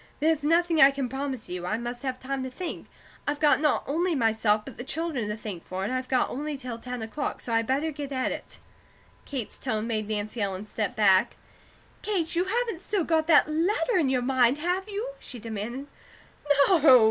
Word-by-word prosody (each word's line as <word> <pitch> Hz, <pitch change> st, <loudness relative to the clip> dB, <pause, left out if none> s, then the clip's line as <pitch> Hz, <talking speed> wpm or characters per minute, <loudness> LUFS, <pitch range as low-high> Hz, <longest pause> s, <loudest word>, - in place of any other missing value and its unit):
There's 315 Hz, 0 st, +2 dB
nothing 330 Hz, +1 st, +3 dB
I 270 Hz, -, +10 dB
can 275 Hz, -2 st, -2 dB
promise 270 Hz, -1 st, -4 dB
you. 180 Hz, 0 st, -5 dB
I 215 Hz, -, 0 dB
must 240 Hz, +1 st, -5 dB
have 260 Hz, -2 st, -3 dB
time 270 Hz, +1 st, -3 dB
to 260 Hz, -, -3 dB
think. 340 Hz, +6 st, -6 dB, 0.4 s
I've 290 Hz, 0 st, 0 dB
got 300 Hz, -2 st, +4 dB
not 300 Hz, -2 st, +2 dB
only 335 Hz, +4 st, 0 dB
myself, 220 Hz, -3 st, +2 dB
but 270 Hz, -, -10 dB
the -, -, -3 dB
children 295 Hz, -6 st, -2 dB
to 210 Hz, -, -3 dB
think 205 Hz, -6 st, -6 dB
for. 185 Hz, +1 st, -4 dB
And 210 Hz, -, -2 dB
I've 255 Hz, 0 st, -3 dB, 0.2 s
only 295 Hz, +3 st, -4 dB
got 280 Hz, -, -6 dB
till 240 Hz, -2 st, -5 dB
ten 250 Hz, -1 st, -5 dB
o'clock, 280 Hz, +7 st, -3 dB
so 235 Hz, -, -4 dB
I 230 Hz, -, +4 dB
better 275 Hz, +7 st, 0 dB
get 285 Hz, -1 st, -6 dB
at 260 Hz, -1 st, 0 dB
it." -, -, -7 dB, 0.7 s
Kate's 260 Hz, -6 st, -5 dB
tone 215 Hz, 0 st, -2 dB
made 215 Hz, -2 st, -2 dB
Nancy 215 Hz, +1 st, -3 dB
Ellen 195 Hz, 0 st, -2 dB
step 210 Hz, -1 st, -3 dB
back. 195 Hz, -3 st, +4 dB, 0.7 s
"Kate, 360 Hz, -6 st, -1 dB
you 350 Hz, +2 st, +2 dB
haven't 455 Hz, -3 st, -1 dB
still 400 Hz, -2 st, 0 dB
got 315 Hz, -1 st, +1 dB
that 325 Hz, -3 st, +6 dB
letter 355 Hz, +10 st, +1 dB
in 290 Hz, -5 st, +2 dB
your 255 Hz, -2 st, +1 dB
mind, 255 Hz, 0 st, +3 dB
have 360 Hz, +6 st, -1 dB
you?" 420 Hz, +5 st, -3 dB
she 250 Hz, -, -8 dB
demanded. 230 Hz, +4 st, -5 dB, 0.8 s
"No!" 295 Hz, -8 st, +7 dB
265 Hz, 205 wpm, -27 LUFS, 225-320 Hz, 0.8 s, I